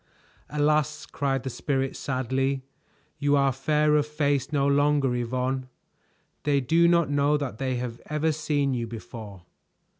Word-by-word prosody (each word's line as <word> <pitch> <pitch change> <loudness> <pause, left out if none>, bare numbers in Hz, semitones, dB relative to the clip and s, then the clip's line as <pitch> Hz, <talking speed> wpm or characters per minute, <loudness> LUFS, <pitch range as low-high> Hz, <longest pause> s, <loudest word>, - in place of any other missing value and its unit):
"Alas!" 150 +1 +1
cried 135 -2 -1
the 135 - -3
Spirit 135 0 -1
sadly. 130 +1 -1 0.6
"You 145 0 +3
are 140 -1 +3
fair 150 +3 +2
of 150 0 +2
face 145 -2 0
no 140 -2 +2
longer, 140 -2 +3
Yvonne. 130 +2 -2 0.7
They 145 -1 +2
do 165 +6 +3
not 170 -4 +3
know 145 +1 +3
that 135 -7 -5
they 130 -1 -1
have 120 -1 -5
ever 150 +1 +1
seen 145 -3 0
you 120 -2 -2
before." 110 -4 -9
140 Hz, 145 wpm, -26 LUFS, 130-150 Hz, 0.7 s, You